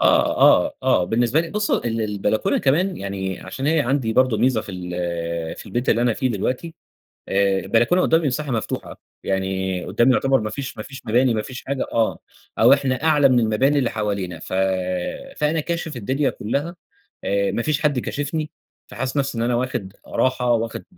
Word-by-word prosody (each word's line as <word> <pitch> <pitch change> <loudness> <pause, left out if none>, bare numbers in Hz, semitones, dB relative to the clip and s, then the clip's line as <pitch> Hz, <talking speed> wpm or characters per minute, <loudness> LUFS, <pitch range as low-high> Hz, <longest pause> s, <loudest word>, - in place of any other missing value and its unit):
آه، - - +3
آه، - - +6
آه، 90 - +3
بالنسبة 120 - +2
لي 165 0 -5
بُصّ 210 +2 -1
ال 115 -1 0
البلكونة 105 0 0
كمان 175 +7 +1
يعني 95 -1 -4
عشان 135 +1 -5
هي 160 0 +3
عندي 130 -4 0
برضه 130 -3 +3
ميزة 125 -4 +2
في 100 - -9
ال 85 -2 -4
في - - -10
البيت 120 +2 -3
اللي 115 - +3
أنا 120 -1 +3
فيه 130 - 0
دلوقتي 125 - -2 0.6
آآ، 100 0 +2
البلكونة 120 - +2
قدّامي 165 -3 +3
مساحة 140 +2 -2
مفتوحة، 115 -3 -3 0.3
يعني 95 -1 -1
قدّامي 125 +2 +3
يعتبر 135 +1 +3
ما 110 - -3
فيش 135 -1 -6
ما 110 - -5
فيش 135 +3 -10
مباني 120 +3 +3
ما 110 - 0
فيش 130 +4 -8
حاجة 140 -1 -2
آه، 115 -1 +1 0.4
أو - - +7
إحنا 135 0 0
أعلى 150 -4 +5
من 125 -1 +4
المباني 130 +6 +2
اللي 125 - +1
حوالينا 100 -5 -3
ف - - -8 0.8
فأنا 150 +1 +1
كاشف 160 -1 -3
الدنيا 135 +6 0
كلّها 145 - -3 0.5
آآ، 100 0 +1
ما - - -1
فيش 150 +3 0
حد 145 -4 +2
كاشفني، 150 +4 -3 0.4
فحاسس 130 +6 -4
نفسي 135 -3 -1
إن 115 - 0
أنا 120 0 +1
واخد 120 -6 -3
راحة، 125 -1 +1
واخد 115 -1 -1
120 Hz, 185 wpm, -22 LUFS, 105-140 Hz, 0.8 s, أو